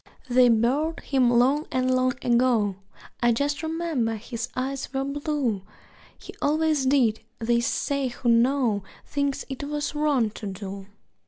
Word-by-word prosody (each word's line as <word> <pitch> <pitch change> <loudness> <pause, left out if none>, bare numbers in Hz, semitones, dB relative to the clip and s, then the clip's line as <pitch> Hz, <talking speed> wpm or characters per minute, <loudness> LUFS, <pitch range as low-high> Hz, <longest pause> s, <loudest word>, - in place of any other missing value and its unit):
They 250 0 +5
buried 260 +8 +1
him 260 -3 +2
long 260 +6 +3
and 255 -2 +1
long 255 0 +1
ago 235 -5 +2 0.5
(I 240 0 +4
just 285 +6 0
remember 320 -8 -1
his 235 +2 -5
eyes 270 +1 -3
were 270 0 -1
blue), 280 -6 -1 0.6
He - - -11
always 305 -2 +2
did 250 -6 +3 0.2
they 235 +1 +1
say 275 +3 -1
who 245 0 -5
know 235 -3 +3 0.2
Things 280 -1 -2
it 270 0 -6
was 295 +1 -3
wrong 290 -7 +1
to 210 - -7
do. 195 0 -7
255 Hz, 145 wpm, -25 LUFS, 235-285 Hz, 0.6 s, They